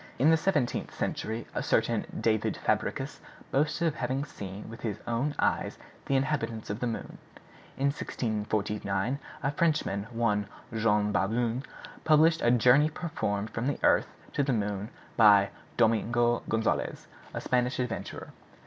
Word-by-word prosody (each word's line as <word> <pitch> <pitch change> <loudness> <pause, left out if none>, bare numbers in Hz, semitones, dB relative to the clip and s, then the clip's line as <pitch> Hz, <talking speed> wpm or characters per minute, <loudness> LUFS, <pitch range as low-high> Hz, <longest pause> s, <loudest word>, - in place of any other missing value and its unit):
In 145 +6 +5
the - - +7
seventeenth 155 -6 0
century 110 +1 -2
a - - -1
certain - - +1
David 110 -2 +1
Fabricius - - -1 0.3
boasted 150 +4 +1
of 160 - +1
having 135 +1 -2
seen 100 -7 -8
with 115 +1 -9
his 105 -3 -2
own 120 +5 -1
eyes - - 0 0.3
the 135 - +2
inhabitants 125 -6 -1
of 105 - -4
the 125 - -1
moon. 115 - -5 0.6
In 140 +1 +2
1649 105 -2 -2 0.2
a 140 - +1
Frenchman, 145 -11 0
one 105 -4 0 0.3
Jean 105 -2 +2
Baudoin, 115 +5 +1 0.4
published 160 +1 +5
a 120 - +3
'Journey 125 +5 +5
performed 110 - -3
from 115 +4 -2
the 145 - 0
Earth - - +4 0.3
to - - +1
the 135 -2 +1
Moon 105 -1 -2 0.3
by 100 -3 +7 0.3
Domingo 120 +1 +3
Gonzalez,' 110 0 0 0.3
a - - -1
Spanish 125 0 +1
adventurer. 125 -2 -4
120 Hz, 140 wpm, -29 LUFS, 105-140 Hz, 0.6 s, the